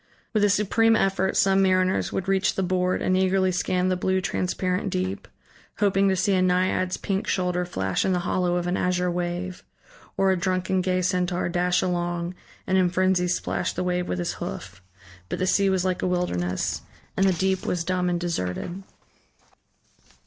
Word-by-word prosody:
With 215 -2 +2
a 205 - +4
supreme 220 +3 +3
effort 195 -2 +1
some 195 0 +4
mariners 185 -1 +2
would 190 - -3
reach 195 +1 +1
the 190 - 0
board 180 0 0
and 185 - +2
eagerly 190 0 +2
scan 185 0 0
the 185 - +1
blue, 190 +1 0
transparent 185 0 -1
deep, 95 +2 -3 0.5
hoping 195 -1 +3
to 190 - +2
see 195 +2 +1
a 185 - +3
naiad's 185 0 +1
pink 195 0 -2
shoulder 180 -1 0
flash 95 - -1
in 190 - +1
the 180 -1 +1
hollow 180 -1 +1
of 175 -1 -1
an 180 +1 0
azure 180 -1 0
wave, 175 +1 -3 0.5
or 195 0 +3
a - - +3
drunken 185 +1 0
gay 185 0 0
centaur 180 -1 0
dash 180 +1 +1
along 175 -1 -2 0.3
and 190 0 +2
in 180 -1 +3
frenzy 185 0 +2
splash 180 - -1
the - - -2
wave 180 0 -1
with 90 - -1
his 90 - -2
hoof. 90 +1 -6 0.5
But - - -2
the 185 - 0
sea 195 +1 +3
was 190 -1 +1
like 185 -1 -1
a - - 0
wilderness, 90 - -1 0.3
and 195 0 +3
the 190 - +3
deep 190 +2 0
was 175 -2 -1
dumb 180 +1 0
and 175 -1 0
deserted. 170 - -3
185 Hz, 185 wpm, -25 LUFS, 180-190 Hz, 0.5 s, a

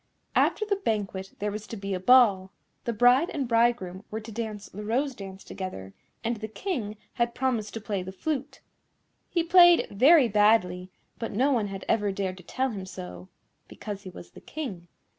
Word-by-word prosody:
After 430 - +2
the 405 -1 0
banquet 200 - -3
there 210 0 -2
was 210 +1 -6
to 225 - -6
be 195 0 -4
a 185 - -2
Ball. 200 -3 +5 0.4
The 235 - 0
bride 245 +8 +4
and 275 -4 -3
bridegroom 230 -5 +1
were 220 - -4
to 220 +1 -10
dance 215 -2 -5
the 210 +3 -8
Rose 260 +6 0
dance 195 -3 -9
together, 95 - -7 0.3
and 235 0 -1
the 220 +1 -5
King 220 - -4 0.2
had 235 0 -1
promised 235 -5 -1
to 225 - -4
play 205 -3 -2
the 185 +1 -7
flute. 275 +7 -4 0.7
He 340 - +1
played 350 0 +7
very 265 +7 +6
badly, 205 -4 +3 0.3
but 230 - -4
no 260 +7 +2
one 230 -6 +1
had 195 -1 -7
ever 205 -2 +1
dared 190 -1 -3
to 180 - -13
tell 260 +8 -1
him 195 -3 -6
so, 90 - -9 0.4
because 205 -2 -7
he 190 - -9
was 175 - -12
the - - -14
King. 200 - -6
215 Hz, 190 wpm, -27 LUFS, 195-245 Hz, 0.7 s, played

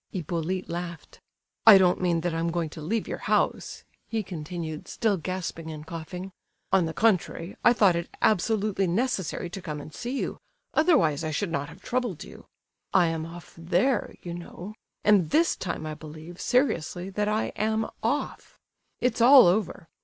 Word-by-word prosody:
Hippolyte 175 +1 -3
laughed. 170 -2 -7 0.5
"I 210 -3 +12
don't 185 -1 +3
mean 170 -2 +1
that 175 0 -1
I 165 - -1
am 165 +1 0
going 165 -1 -1
to 160 - -9
leave 220 +9 -1
your - - -4
house," - - 0 0.2
he 225 -2 -2
continued, 165 -3 -6
still 220 -3 +1
gasping 170 -1 -4
and 155 -1 -7
coughing. 180 +4 -7 0.4
"On 190 -3 +4
the 160 - -4
contrary, 185 -4 +1
I 240 - +7
thought 200 -7 +4
it 170 0 -3
absolutely 210 -1 +2
necessary 190 -3 -1
to 195 - -6
come 150 -4 -5
and 150 +2 -10
see 245 +3 -4
you; - - -3 0.3
otherwise 265 - +3
I 155 - -1
should 165 +4 -2
not 145 -2 -2
have 170 +5 -14
troubled 240 -9 -2
you. - - -13 0.5
I 175 -3 +4
am 160 0 -3
off 170 0 -11
there, 180 +9 0
you 175 - -5
know, 175 +3 -8 0.3
and 200 -7 +4
this 330 - +3
time 180 - -4
I 155 - -4
believe, 155 +3 -10
seriously, 190 - 0
that 210 +2 -1
I 215 +1 0
am 220 +1 0 0.2
off! - - -2 0.4
It's 245 -2 +1
all 260 0 +9
over. 180 -2 0
180 Hz, 175 wpm, -27 LUFS, 165-210 Hz, 0.5 s, I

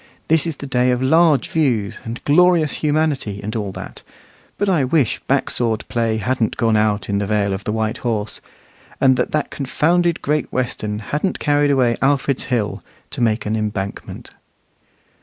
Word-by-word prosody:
This 160 +1 +3
is 165 - -3
the 140 - -8
day 125 -1 +1
of 125 -1 +1
large 155 +2 +3
views, 115 -9 0
and 115 +2 -7
glorious 165 0 +4
humanity, 150 -9 0
and 110 +2 -4
all 105 -3 -2
that; - - -9 0.6
but 205 - 0
I 175 -7 +2
wish 130 -2 +1
back - - +1
sword 115 -2 0
play 115 -2 0
hadn't 120 0 -1
gone 115 -1 +2
out 105 -2 +1
in 100 0 0
the 100 - -2
Vale 100 -2 +1
of 95 +1 -6
White 110 +1 -1
Horse, 110 -3 -3 0.6
and 130 -1 +5
that - - 0
that 150 -1 -1
confounded 170 +5 +1
Great 150 +1 -1
Western 110 -4 -2 0.2
hadn't 165 +6 0
carried 145 -1 +2
away 125 -4 +2
Alfred's 135 -1 +1
Hill 120 -5 -1 0.3
to - - -5
make 115 -1 +1
an 105 +1 -1
embankment. 105 -2 -4
125 Hz, 170 wpm, -20 LUFS, 110-150 Hz, 0.6 s, and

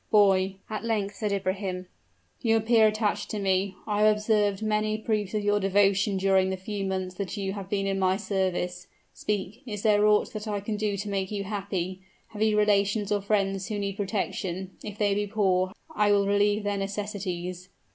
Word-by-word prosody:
"Boy," 195 -2 +4
at 215 0 -4
length 210 -3 -1
said 210 0 -2
Ibrahim, 190 -1 -2 0.6
"you 225 -2 +3
appear 220 0 +5
attached 215 -1 -1
to 215 - -3
me. 190 0 +1
I 210 -1 0
have 215 0 +6
observed 210 -1 +1
many 215 0 +1
proofs 215 -2 -1
of 210 - 0
your 205 0 +2
devotion 195 0 +3
during 190 0 +3
the 190 - -2
few 200 +2 -4
months 190 -1 -2
that 200 0 -4
you 195 -1 -2
have 195 -2 -7
been 195 -1 0
in 195 0 0
my 190 0 +2
service. 185 -3 -2 0.3
Speak 210 +1 -3
is 210 -3 -5
there 210 -1 +4
aught 210 0 +3
that 215 0 -5
I 205 -1 -1
can 210 +2 -3
do 205 -1 -1
to 205 +2 -4
make 195 -2 -1
you 205 -2 -3
happy? 190 -2 -3 0.3
Have 210 -1 -8
you 215 -1 +3
relations 205 0 +2
or 205 -1 +2
friends 195 -2 0
who 215 -2 -3
need 200 -1 -2
protection? 190 -2 -3
If 210 -1 -7
they 205 -1 +2
be 205 +1 -1
poor, 190 -3 +1 0.2
I 210 -1 +3
will 200 -1 +4
relieve 205 +1 +2
their 205 0 -1
necessities." 195 -3 -4
200 Hz, 195 wpm, -27 LUFS, 190-210 Hz, 0.6 s, have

